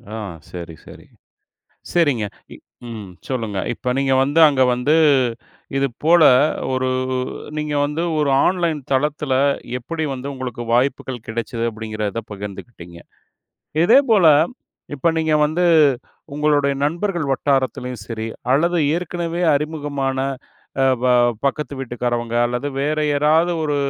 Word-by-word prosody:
ஆ, - - -4 0.3
சரி, 85 -2 -8
சரி. - - -13 0.9
சரிங்க. 145 -11 +2 0.3
இப் - - -15 0.3
ம். 105 -5 -8 0.2
சொல்லுங்க. 115 -7 -3
இப்ப 125 +1 -3
நீங்க 135 -1 +1
வந்து, 145 +4 +1
அங்க 135 -3 +3
வந்து, 125 +5 +1 0.8
இதுபோல 150 +6 +3 0.5
ஒரு 130 0 0 0.7
நீங்க 150 -1 -2
வந்து, 150 +4 -3 0.2
ஒரு 150 -2 +1 0.2
ஆன்லைன் 170 -5 0
தளத்தில 145 0 0 0.5
எப்படி 160 +6 -4
வந்து 130 +1 -6
உங்களுக்கு 125 -3 -5
வாய்ப்புகள் 125 -1 -1
கிடைச்சது 115 +1 -4
அப்பிடிங்கிறத 110 0 -4
பகிர்ந்துக்கிட்டீங்க. 100 -3 -9 0.9
இதேபோல 225 -4 +5 0.7
இப்ப 145 +4 0
நீங்க 160 -1 +1
வந்து 165 +4 -1 0.7
உங்களுடைய 145 -1 +2
நண்பர்கள் 170 +1 -1
வட்டாரத்திலும் 130 -3 -1
சரி, 110 -1 -5 0.3
அல்லது 170 +5 +2 0.2
ஏற்கனவே 175 0 -3
அறிமுகமான 145 -3 -2 0.6
அ, - - +4 0.2
ப - - +1 0.4
பக்கத்து 140 0 -1
வீட்டுக்காரவங்க 120 -2 -2
அல்லது 125 +4 -3
வேற 150 +2 0
யாராவது 155 +4 +2
ஒரு, 145 -2 0
140 Hz, 115 wpm, -20 LUFS, 120-155 Hz, 0.9 s, இதேபோல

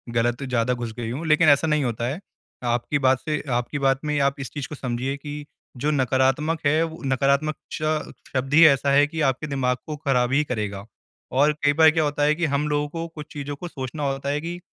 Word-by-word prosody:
गलत 120 +3 +1
ज़्यादा 125 -2 0
घुस 120 -2 -5
गई 120 -2 -4
हूँ 145 +7 -4
लेकिन 155 +1 +5
ऐसा 145 +3 +4
नहीं 150 -2 +2
होता 120 -2 -2
है। 140 +7 -3 0.4
आपकी 120 +4 0
बात 130 -1 +3
से 150 -2 -2
आपकी 120 +4 -1
बात 135 -1 +2
में 150 -1 0
आप 140 0 +1
इस 135 - -5
चीज़ 145 -2 -4
को 150 - -6
समझिए 130 0 -3
कि 145 +1 -7 0.3
जो 145 +5 0
नकारात्मक 135 +4 +1
है 155 +3 +3
वो 160 0 -6
नकारात्मक 140 +3 +1 0.2
च 155 0 -2 0.2
शब्द 135 +1 -2
ही 160 +2 +8
ऐसा 140 -1 +3
है 145 +1 +5
कि 160 +2 -4
आपके 135 +4 -3
दिमाग 130 -3 0
को 155 - -5
ख़राब 130 -4 +1
ही 150 +2 +3
करेगा। 105 -7 -4 0.5
और 145 +4 +3
कई 145 0 +4
बार 160 +1 +7
क्या 160 0 +1
होता 145 0 0
है 150 +1 +3
कि 170 +1 0
हम 145 0 0
लोगों 145 0 0
को 165 +2 -5
कुछ 150 -1 -7
चीज़ों 145 0 -5
को 175 +5 -7
सोचना 135 -1 -6
होता 135 +1 -3
है 145 +1 -1
कि 170 +2 -5
140 Hz, 230 wpm, -24 LUFS, 130-150 Hz, 0.5 s, ही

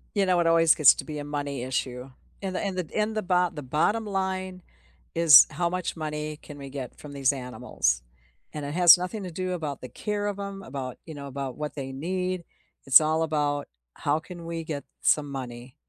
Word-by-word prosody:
You 200 -1 +3
know, 180 -2 +3
it 170 - +2
always 165 -1 +5
gets 150 -6 +8
to - - -6
be 150 -2 -5
a - - -4
money 145 -3 -4
issue 130 0 -3 0.3
and 190 -2 -4
the - - 0
and 195 -2 -3
the 180 -4 -4
and 215 +1 0
the - - +1
bot 180 -2 +1
the 150 - -6
bottom 160 - +1
line 190 -2 -3 0.5
is 165 -5 +9
how 175 -1 0
much 180 0 -3
money 150 -1 -4
can 145 -1 -12
we 140 - -8
get 135 -2 -6
from 150 - -10
these 140 0 +2
animals, 125 - -1 0.5
and 150 - -5
it 145 - -4
has 175 -1 +9
nothing 185 +4 -4
to 180 - -6
do 185 +2 -3
about 150 -6 -4
the 125 - -8
care 205 - -3
of 200 -1 -3
'em, 200 -1 -5
about, 130 -4 -6
you 160 - -8
know, 140 -1 -7
about 135 -1 -5
what 150 -1 -4
they 135 -2 -5
need, 180 +5 -2 0.4
it's 135 +2 +8
all 155 +1 +1
about 145 -2 -1 0.3
how 155 - 0
can 170 0 -10
we 165 0 -4
get 150 -3 -5 0.2
some 145 -2 +2
money, 125 -1 -7
155 Hz, 215 wpm, -26 LUFS, 140-180 Hz, 0.5 s, is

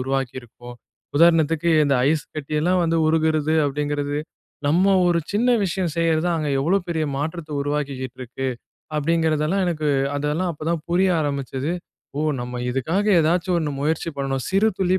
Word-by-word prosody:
உருவாக்கியிருக்கோம்? 125 -2 -4 0.4
உதாரணத்துக்கு 165 0 +4
இந்த 140 - +2 0.2
ஐஸ் 155 -2 0
கட்டியெல்லாம் 155 +5 0
வந்து 165 0 +1
உருகுறது 155 -1 +2
அப்படிங்கிறது, 145 0 -1 0.5
நம்ம 185 +6 +4
ஒரு 170 -1 +3
சின்ன 225 +5 +2 0.2
விஷயம் 180 -2 -1
செய்யறது 165 -1 +2
தான், 175 -1 +1
அங்க 155 -2 -2
எவ்வளோ 175 +8 +2
பெரிய 160 -2 0
மாற்றத்த 155 +2 -4
உருவாக்கிக்கிட்ருக்கு! 135 -3 -4 0.5
அப்டிங்கிறதெல்லாம் 160 +3 +1
எனக்கு, 155 -4 0 0.3
அதெல்லாம் 150 +5 -1
அப்போ 155 - -9
தான் 170 -2 -1
புரிய 185 +2 +3
ஆரம்பிச்சது. 140 0 -2 0.5
"ஓ! - - 0 0.2
நம்ம 125 0 -5
இதுக்காக 160 - -1
ஏதாச்சும் 175 +3 +1
ஒண்ணு 155 -3 -2
முயற்சி 160 +3 -1
பண்ணணும். 135 -2 -2
சிறு 200 +3 +3
துளி 185 0 +2
155 Hz, 140 wpm, -22 LUFS, 140-170 Hz, 0.5 s, உதாரணத்துக்கு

